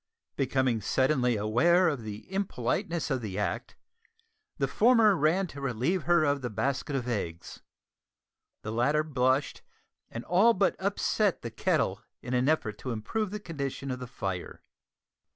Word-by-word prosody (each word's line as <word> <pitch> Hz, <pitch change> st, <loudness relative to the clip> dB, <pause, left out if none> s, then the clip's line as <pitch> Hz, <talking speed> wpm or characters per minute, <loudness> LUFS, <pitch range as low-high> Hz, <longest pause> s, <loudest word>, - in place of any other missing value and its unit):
Becoming 130 Hz, -4 st, +1 dB
suddenly 130 Hz, 0 st, +2 dB
aware 145 Hz, -, +3 dB
of 145 Hz, -7 st, -1 dB
the 105 Hz, -1 st, -7 dB
impoliteness 175 Hz, -, -1 dB
of 130 Hz, -2 st, 0 dB
the 100 Hz, -4 st, -5 dB
act, 105 Hz, -, -3 dB, 0.8 s
the -, -, +1 dB
former 225 Hz, -3 st, +5 dB
ran 165 Hz, +5 st, +2 dB
to 140 Hz, -, -8 dB
relieve 135 Hz, -, -1 dB
her 170 Hz, -1 st, +4 dB
of 145 Hz, -2 st, +1 dB
the 125 Hz, -, -3 dB
basket 135 Hz, +6 st, -2 dB
of 125 Hz, -2 st, -2 dB
eggs; 85 Hz, -8 st, -4 dB, 1.0 s
the 105 Hz, -, -4 dB
latter 140 Hz, +7 st, +2 dB
blushed, 135 Hz, -2 st, 0 dB, 0.5 s
and 115 Hz, -, -7 dB
all 205 Hz, +7 st, +4 dB
but 190 Hz, 0 st, +2 dB
upset 200 Hz, 0 st, 0 dB
the 115 Hz, -, -5 dB
kettle 115 Hz, -, 0 dB, 0.2 s
in 125 Hz, -, -4 dB
an 125 Hz, +3 st, +2 dB
effort 110 Hz, -10 st, 0 dB
to 130 Hz, -, -6 dB
improve 125 Hz, -, -2 dB
the 210 Hz, +2 st, -5 dB
condition 140 Hz, -7 st, -5 dB
of 125 Hz, -, -4 dB
the 125 Hz, -, -6 dB
fire. 95 Hz, -6 st, -5 dB
135 Hz, 150 wpm, -29 LUFS, 120-175 Hz, 1.0 s, former